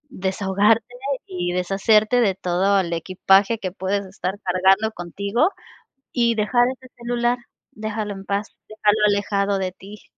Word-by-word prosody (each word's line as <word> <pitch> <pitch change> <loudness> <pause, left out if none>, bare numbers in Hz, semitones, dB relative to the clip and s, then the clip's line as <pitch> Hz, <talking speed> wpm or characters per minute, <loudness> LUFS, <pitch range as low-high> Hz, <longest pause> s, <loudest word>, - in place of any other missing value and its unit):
desahogarte 200 +3 +1 0.4
y 175 -1 -3
deshacerte 210 +6 +3
de 200 -5 +2
todo 190 +2 +1
el 170 -3 -2
equipaje 195 +5 +2
que 185 -4 -4
puedes 195 +2 -2
estar 190 0 -4
cargando 190 +4 +3
contigo 200 - 0 0.6
y 235 -2 +2
dejar 240 +3 +2
ese 255 -1 -9
celular, 240 0 0 0.3
déjalo 215 -1 -4
en 195 0 -10
paz, 200 +2 -1 0.2
déjalo 215 0 +1
alejado 200 -1 0
de 185 -1 -2
ti. 200 +3 -13
200 Hz, 135 wpm, -22 LUFS, 190-220 Hz, 0.6 s, deshacerte